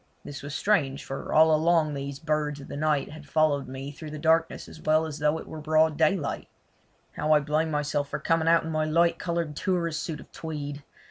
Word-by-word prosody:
This 145 - -7
was 145 +1 -6
strange, 145 -11 +1
for 135 - -6
all 160 +1 +6
along 160 -1 +3
these 140 0 -5
birds 150 -1 -1
of 140 - -10
the - - -6
night 150 -1 0
had 155 -2 -11
followed 150 -3 +2
me 135 +2 -6
through 155 +2 -9
the 155 - -6
darkness 160 +2 +1
as - - -12
well 155 +1 +3
as 155 -1 -6
though 150 +1 +2
it - - -8
was 155 - -7
broad 155 0 +3
daylight. 155 0 0 0.6
How 155 +1 +1
I 150 - +6
blamed 155 +2 0
myself 145 -1 -1
for 150 - -2
coming 165 +2 +1
out 165 0 +5
in 165 - -4
my 155 0 0
light 165 +2 +2
coloured 170 -3 -2
tourist 170 -3 -1
suit 155 -3 -4
of - - -14
tweed. 145 -2 -6
155 Hz, 215 wpm, -27 LUFS, 145-160 Hz, 0.6 s, all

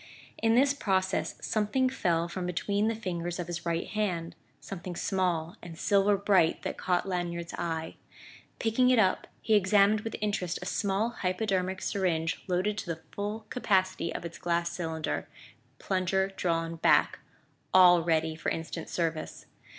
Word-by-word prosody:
In 225 0 +3
this 275 +3 +4
process 190 -7 0
something 220 +5 +1
fell 175 -10 0
from 180 +1 -4
between 200 +4 0
the 225 - 0
fingers 175 -5 -3
of 175 - -3
his 170 0 -5
right 170 0 0
hand 180 -6 -2 0.2
something 180 -2 -7
small 175 -4 -1
and 165 -2 -9
silver 200 +2 +3
bright 190 -4 +3
that - - -3
caught 180 +1 0
Lanyard's 175 -2 -3
eye. 165 -2 -3 0.6
Picking 235 +3 +2
it 255 - +4
up, 190 -4 +2 0.2
he 220 - +2
examined 205 +1 +4
with 225 0 -5
interest 200 -4 -1
a - - -6
small 200 +3 0
hypodermic 190 0 -1
syringe 175 -4 -1
loaded 190 +3 0
to - - -6
the 165 -1 -4
full 205 +2 -4
capacity 190 -7 +1
of - - -5
its 170 - -7
glass 170 0 0
cylinder, 160 -2 -3 0.5
plunger 190 +2 0
drawn 165 -2 -1
back - - +3 0.5
all 180 -2 +7
ready 160 -1 +1
for 155 - -2
instant 165 0 -4
service. 165 -2 -3
185 Hz, 150 wpm, -29 LUFS, 170-205 Hz, 0.6 s, all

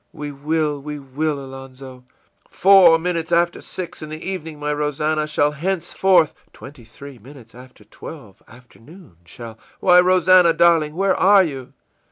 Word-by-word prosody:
î 150 -1 -7
ìWe 140 -1 -17
will, 150 -2 -1
we 150 +1 -7
will, 145 +2 -4
Alonzo!î 135 -1 -12 0.5
ìFour 185 -4 +5
minutes 170 -1 -4
after 170 0 0
six, 180 -2 -8
in 155 - -8
the 155 0 -7
evening, 160 -5 -6
my 150 0 -3
Rosannah, 150 +1 -2
shall 150 -1 0
henceforth 180 +1 0 0.2
î - - -21
ìTwenty 130 -4 -14
three 135 +2 -13
minutes 125 0 -16
after 125 -3 -16
twelve, 105 -1 -13
afternoon 125 - -18
shall 115 +5 -11 0.2
î - - -13
ìWhy; 180 0 +7
Rosannah, 180 -1 +4
darling, 160 -3 +2
where 195 +1 +1
are 195 0 +4
you? 135 -7 -7
150 Hz, 160 wpm, -19 LUFS, 135-170 Hz, 0.5 s, ìWhy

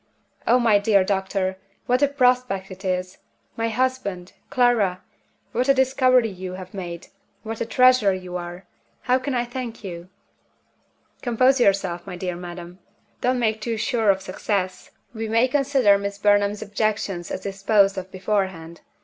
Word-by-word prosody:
Oh, 240 - +5
my 225 -4 +4
dear 200 -2 +3
doctor, 190 -1 -1 0.3
what 250 +2 +1
a 285 - +5
prospect 250 -8 +1
it 185 +1 -10
is! 185 0 -2 0.4
My 230 0 -1
husband! 220 -7 -2 0.2
Clara! 230 -8 +2 0.5
What 250 +3 0
a 275 - +6
discovery 255 -2 +3
you 185 -1 -7
have 185 0 -9
made 175 -3 -7 0.3
what 225 0 -6
a 230 - -1
treasure 255 -4 +5
you 185 -1 -5
are! 175 +1 -6 0.4
How 255 +1 +2
can 260 0 -3
I 240 0 0
thank 240 -2 -6
you?" 175 -2 -7 1.1
"Compose 255 +2 +3
yourself, 190 -6 +1
my - - -6
dear 180 0 -4
madam. 175 0 -9 0.4
Don't 255 +1 +1
make 220 -2 0
too 230 0 -2
sure 225 -1 +1
of 190 -1 +2
success. 185 0 -3 0.2
We 225 -1 -4
may 230 +3 +3
consider 265 -7 +3
Miss 200 0 -4
Burnham's 205 0 +2
objections 205 -4 -2
as - - -4
disposed 195 +1 +2
of 190 0 -6
beforehand. 185 -4 -2
205 Hz, 155 wpm, -23 LUFS, 185-245 Hz, 1.1 s, a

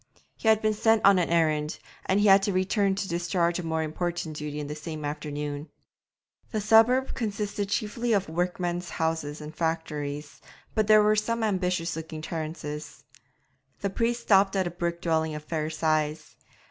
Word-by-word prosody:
He - - -5
had 220 0 +5
been 215 0 +3
sent 225 +1 +3
on 200 -2 +7
an 175 - 0
errand, 155 -2 +1 0.3
and 190 +2 +3
had 195 -1 +7
to 200 - 0
return 195 +1 +1
to 195 0 -3
discharge 170 0 0
a - - -4
more 160 -1 -1
important 165 0 -3
duty 150 0 -5
in 150 - -4
the 145 - -5
same 155 0 -6
afternoon. 145 0 -4 0.8
The 215 - -2
suburb 225 +5 +4
consisted 205 -3 -3
chiefly 230 +3 -1
of 200 -3 +2
workmen's 175 +1 -2
houses 160 -2 -2
and 150 +1 -8
factories, 150 -3 -3 0.3
but 215 -2 +1
there 215 -1 +7
were 210 0 +4
some 230 +2 0
ambitious 180 -5 0
looking 160 -1 -7
terraces. 155 -2 -5 0.8
The 200 - -1
priest 235 +3 0
stopped 195 -2 +4
at 190 -1 +2
a 175 - -2
brick 170 0 -3
dwelling 160 -2 +1
of 150 - -6
fair 155 0 -2
size. 155 -1 -1
170 Hz, 170 wpm, -27 LUFS, 155-205 Hz, 0.8 s, on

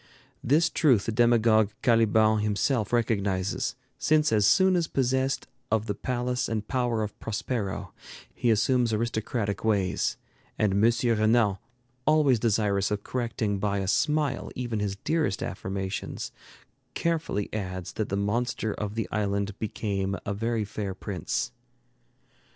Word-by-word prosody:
This 155 +6 +4
truth 130 -11 +3
the - - -1
demagogue 115 -2 +4
Caliban 110 -2 +4
himself 105 +2 0
recognizes, 100 -5 0 0.2
since 155 -1 +3
as 105 -2 +4
soon 190 - +5
as 170 -2 +1
possessed 130 +1 0 0.2
of 110 -1 +1
the 105 - -1
palace 125 +3 -2
and 110 -2 -2
power 120 -4 0
of 105 - -6
Prospero, 105 -2 -3 0.4
he 120 - 0
assumes 120 +2 +3
aristocratic 110 -1 -2
ways; 100 -4 +1 0.4
and 105 -3 +2
M. 110 +4 +4 0.2
Renan, 110 -2 +3 0.5
always 150 -6 +4
desirous 105 -3 +1
of 105 -1 -2
correcting 115 -5 -2
by 100 0 0
a 95 -1 -2
smile 150 +5 +1
even 120 -4 -2
his 100 -1 -1
dearest 155 0 -1
affirmations, 95 +1 -4 0.6
carefully 165 -11 -1
adds 95 -4 -4
that 110 - -2
the 100 - -1
monster 110 +1 -1
of 105 0 -4
the 115 -5 -2
island 100 -1 -1
became 100 -2 -2
a 100 - -1
very 115 +1 -1
fair 100 -1 -4
prince. 95 +3 -3
110 Hz, 135 wpm, -27 LUFS, 100-120 Hz, 0.6 s, soon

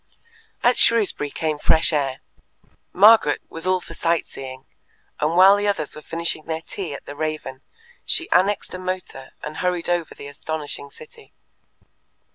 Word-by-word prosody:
At 245 +1 +4
Shrewsbury 210 -10 +3
came 155 0 -2
fresh 160 +2 +3
air. 135 -3 -1 0.7
Margaret 205 -5 +6
was 165 +2 -5
all 185 0 +3
for 165 - -11
sight 165 0 0
seeing, 130 -1 -9 0.5
and 155 +3 0
while 190 +2 +8
the 205 0 -1
others 195 -7 -1
were 150 - -9
finishing 165 0 -2
their 160 0 -4
tea 170 -7 -6
at - - -11
the 145 - -8
Raven, 155 -3 -4 0.4
she 340 - -1
annexed 195 +3 +2
a 185 - -5
motor 185 -7 -6
and 150 - -6
hurried 180 -2 -1
over 175 -2 -1
the - - -10
astonishing 145 0 -6
city. 465 - -16
165 Hz, 155 wpm, -22 LUFS, 150-185 Hz, 0.7 s, while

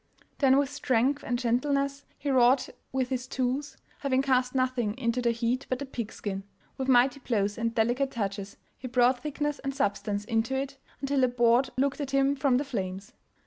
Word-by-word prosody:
Then 270 -2 +5
with 280 0 +1
strength 275 -1 +1
and 245 - -1
gentleness 275 +3 0
he 280 0 -2
wrought 255 0 +4 0.2
with 260 -1 -1
his 255 -1 -2
tools, 260 +3 -2 0.2
having 265 -1 +1
cast 255 -1 +1
nothing 255 -4 0
into 245 -1 0
the 240 - +2
heat 235 +3 -1
but 255 - 0
the 280 - -5
pig 235 -5 -5
skin; 195 -2 -5 0.3
with 265 - -3
mighty 255 +1 +4
blows 205 -6 0
and 230 0 -2
delicate 245 +5 +2
touches 200 -4 -4 0.2
he 255 - -6
brought 250 +1 +3
thickness 295 0 -2
and 275 0 -4
substance 205 -4 -1
into 225 +3 0
it, 275 0 -3 0.2
until 275 -1 +1
a - - +6
board 240 +1 +3
looked 275 +2 +1
at 280 - -3
him 275 +1 +2
from 270 -2 +2
the 285 - -1
flames. 195 -6 -4
255 Hz, 185 wpm, -28 LUFS, 235-275 Hz, 0.3 s, a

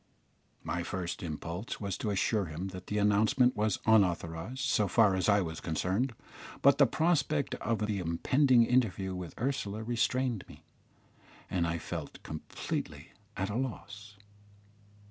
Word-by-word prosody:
My 90 - -2
first 85 0 -4
impulse 85 +5 -5
was 100 -3 -3
to 110 - -2
assure 100 +1 +1
him 85 +4 -5
that 95 0 -9
the 105 - -2
announcement 110 +5 +3
was 105 -1 +1
unauthorised 95 +2 +1
so 110 -6 +2
far 105 -1 +4
as 95 +2 +1
I 100 0 +5
was 80 -2 -5
concerned, 95 - -1 0.5
but 140 +1 +6
the 140 - +7
prospect 155 -1 +1
of 110 -1 0
the 105 -2 -1
impending 120 - +3
interview 110 -6 +1
with 90 -2 -7
Ursula 110 -4 -2
restrained 120 0 0
me, - - -14 0.9
and 85 -2 +1
I 85 0 -1
felt - - -6
completely 80 - -5 0.3
at 95 +2 -1
a - - -3
loss. 105 -5 -5
105 Hz, 145 wpm, -31 LUFS, 90-120 Hz, 0.9 s, the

